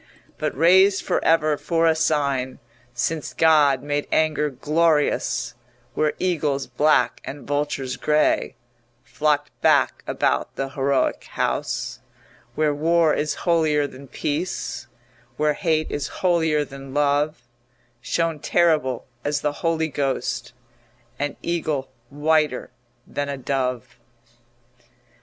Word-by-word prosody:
But - - -2
raised 190 +4 +5
for - - 0
ever 155 -2 +3
for 165 +3 0
a 165 - +5
sign 140 -5 0 0.3
Since 150 +6 -3
God 150 -5 +4
made 145 0 -2
anger 155 -1 +2
glorious, 150 -3 +1 0.4
Where 155 -1 +1
eagles 150 -6 0
black 150 -5 +2
and 140 +1 -8
vultures 145 -3 -2
grey 150 0 +1 0.5
Flocked 145 +2 0
back - - +3
about 65 0 0
the 135 0 -3
heroic 135 0 0
house, - - -2 0.6
Where 155 -1 +2
war 165 +1 +3
is 150 0 -1
holier 160 -4 +2
than 140 0 -10
peace, 155 +7 -3 0.5
Where 150 0 +2
hate 160 -2 0
is 145 -1 -2
holier 160 -5 +1
than 135 0 -10
love, 145 -1 +1 0.6
Shone 165 +2 -1
terrible 155 -7 +1 0.2
as 145 0 -1
the 150 -1 0
Holy 165 -1 +1
Ghost 130 -4 -2 0.7
An 145 0 -2
eagle 155 -6 -2 0.2
whiter 150 -1 +1 0.3
than 145 0 -4
a 140 - -3
dove. 125 -2 -3
150 Hz, 115 wpm, -23 LUFS, 140-160 Hz, 0.7 s, raised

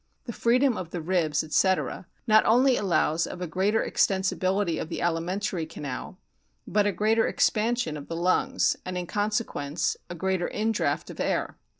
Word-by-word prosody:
The 235 - -5
freedom 245 +2 +2
of 175 -3 -5
the 175 - -4
ribs, 160 -3 0
etc., 185 +3 0 0.2
not 215 -2 +5
only 250 +3 +5
allows 170 -5 +1
of 180 - -7
a 180 - -3
greater 190 +6 0
extensibility 190 -2 +1
of 160 - -6
the - - -4
alimentary 175 +1 -1
canal, 145 -5 -6 0.5
but 205 0 +2
a - - +2
greater 215 +4 +2
expansion 220 -6 +1
of 145 -1 -8
the 165 - -5
lungs, 180 +2 +1
and, 185 0 -4
in 180 - -3
consequence, 205 -7 -1
a 175 - -6
greater 190 0 -1
indraught 220 0 -1
of - - -12
air. - - -1
190 Hz, 165 wpm, -26 LUFS, 170-215 Hz, 0.5 s, not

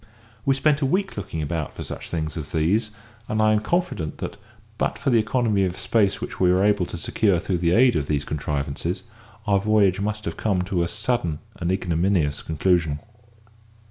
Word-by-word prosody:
We 135 - +4
spent 145 +2 +2
a - - +3
week 195 +6 0
looking 95 -6 -4
about 75 0 -3
for - - -5
such - - -7
things 80 -2 -3
as 75 -4 -6
these, 100 +8 +2 0.4
and 110 - 0
I 110 0 +4
am 105 - +3
confident 110 - -1
that, - - -5 0.4
but - - 0
for 140 - 0
the 115 - +5
economy 110 -3 +1
of 90 -1 -1
space 95 +1 +2
which - - -6
we 90 -1 +4
were 95 +2 +3
able 100 -4 +2
to - - -6
secure 95 +2 +1
through 90 0 -1
the 85 0 +2
aid 125 0 +5
of 75 -3 0
these 75 -2 0
contrivances, 75 +4 -3 0.4
our 100 -2 +3
voyage 100 -2 +3
must 105 +1 -2
have 85 - -4
come 95 -4 +1
to 90 -1 -1
a 85 - +1
sudden 105 -6 -1 0.2
and 85 +1 -1
ignominious 85 -4 +1
conclusion. 80 -2 +1
95 Hz, 195 wpm, -24 LUFS, 80-110 Hz, 0.4 s, the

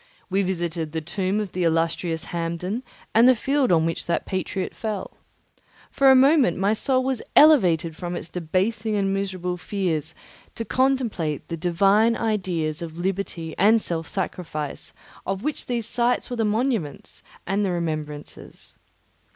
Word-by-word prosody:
We 195 +1 +2
visited 170 -4 -2
the 160 - -1
tomb 185 +5 -1
of 205 -4 -3
the 185 - -3
illustrious 165 0 0
Hampden 170 +6 -2 0.3
and 230 +3 +6
the 255 - +6
field 270 +2 +1
on 160 -2 +4
which 165 - -3
that 170 - 0
patriot 190 0 -3
fell. 215 -4 -5 0.8
For 275 -1 +4
a 265 - +8
moment 270 - +5
my 195 +3 +2
soul 255 +3 +1
was 260 -3 -1
elevated 175 - +5
from 175 +1 -5
its 170 - -5
debasing 195 +6 -1
and 195 -1 +1
miserable 185 -2 -2
fears 170 -5 -2 0.4
to 230 - -4
contemplate 240 - 0
the 165 - -2
divine 195 +7 +3
ideas 180 -8 -1
of 165 -1 -7
liberty 175 -3 -3
and 220 +4 +5
self 165 -5 -2
sacrifice 155 -5 -4 0.3
of 195 +2 -3
which 300 +1 -3
these 235 -3 -2
sights 240 +2 0
were - - -1
the 225 - +1
monuments 215 - -2 0.2
and 195 +3 0
the 195 - +1
remembrancers. 155 -4 -5
190 Hz, 150 wpm, -24 LUFS, 165-225 Hz, 0.8 s, a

